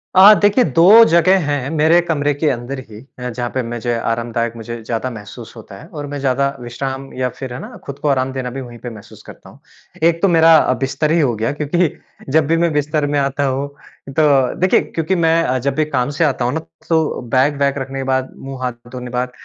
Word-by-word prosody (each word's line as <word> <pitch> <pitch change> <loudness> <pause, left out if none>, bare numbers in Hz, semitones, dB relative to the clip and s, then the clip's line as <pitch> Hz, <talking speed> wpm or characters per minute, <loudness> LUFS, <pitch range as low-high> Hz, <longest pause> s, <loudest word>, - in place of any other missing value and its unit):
अ, 195 +3 +9
देखिए 205 +5 +4
2 180 - +7
जगह 185 +1 +4
हैं 145 -2 -2
मेरे 160 +2 +3
कमरे 145 -4 0
के 145 +2 0
अंदर 130 +1 -4
ही 105 -1 -11 0.2
अ, 125 0 -4
जहाँ 120 0 -4
पे 130 - -1
मुझे 120 0 -3 0.2
आरामदायक 115 0 -2
मुझे 115 0 -7
ज़्यादा 115 +2 -3
महसूस 110 +1 -10
होता 110 -3 -12
है - - -13
और 150 -5 -7
मैं 145 - -4
ज़्यादा 140 0 +1
विश्राम 135 +3 -5
या 125 0 -1
फ़िर 130 0 -8
है 125 - -6
ना, - - -9
खुद 140 -1 -8
को - - -2
आराम 130 -1 +1
देना 130 -1 -4
भी 135 +2 -6
वहीं 120 -2 -10
पे 125 - -4
महसूस 110 -3 -13
करता - - -14
हूँ। - - -18 0.4
एक 170 0 +3
तो 195 - +4
मेरा 165 -2 +6 0.2
बिस्तर 140 +3 -1
ही 170 - +3
हो 130 -7 +1
गया 110 +2 -1
क्योंकि 160 +3 +1 0.4
जब 150 +1 +2
भी 165 +2 +2
मैं 170 0 +1
बिस्तर 150 +1 0
में 145 0 0
आता 140 +1 -1
हूँ, 135 +1 -1 0.4
तो 135 -2 +2
देखिए 185 +1 +3
क्योंकि 165 +3 -2
मैं 165 -6 +2
जब 140 +1 -1
भी 155 - +1
काम 130 -4 -1
से 170 - +2
आता 130 -4 0
हूँ 125 - 0
ना, 160 - -1 0.3
तो 160 -4 +1
बैग-वैग 140 +3 +1
रखने 135 0 -5
के - - -2
बाद, 130 0 -1
मुँह-हाथ 125 -3 -6
धोने 125 -1 -7
बाद 125 +1 -2
135 Hz, 220 wpm, -18 LUFS, 125-155 Hz, 0.4 s, अ